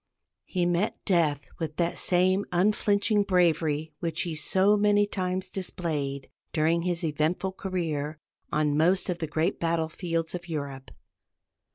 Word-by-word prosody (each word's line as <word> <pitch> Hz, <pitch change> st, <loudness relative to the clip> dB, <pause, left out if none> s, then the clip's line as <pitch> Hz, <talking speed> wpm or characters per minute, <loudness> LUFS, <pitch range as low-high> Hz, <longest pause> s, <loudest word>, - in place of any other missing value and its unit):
He 180 Hz, -2 st, 0 dB
met 175 Hz, +5 st, 0 dB
death 160 Hz, -7 st, +2 dB
with 155 Hz, -2 st, -3 dB
that 170 Hz, 0 st, 0 dB
same 185 Hz, +2 st, +2 dB
unflinching 205 Hz, +3 st, +2 dB
bravery 160 Hz, -5 st, +1 dB
which 165 Hz, -2 st, -2 dB
he 170 Hz, -3 st, -3 dB
so 190 Hz, +6 st, +4 dB
many 205 Hz, 0 st, +4 dB
times 185 Hz, -2 st, -2 dB
displayed, 150 Hz, -7 st, -3 dB, 0.3 s
during 165 Hz, +1 st, +2 dB
his 175 Hz, 0 st, -1 dB
eventful 160 Hz, +5 st, 0 dB
career, 160 Hz, -6 st, -3 dB, 0.3 s
on 150 Hz, -1 st, +1 dB
most 175 Hz, +5 st, +2 dB
of 175 Hz, -1 st, -2 dB
the 160 Hz, -, -2 dB
great 160 Hz, +4 st, 0 dB
battle 165 Hz, -1 st, 0 dB
fields 165 Hz, -1 st, -2 dB
of 175 Hz, 0 st, -6 dB
Europe. 140 Hz, -4 st, -5 dB
170 Hz, 140 wpm, -27 LUFS, 155-185 Hz, 0.3 s, so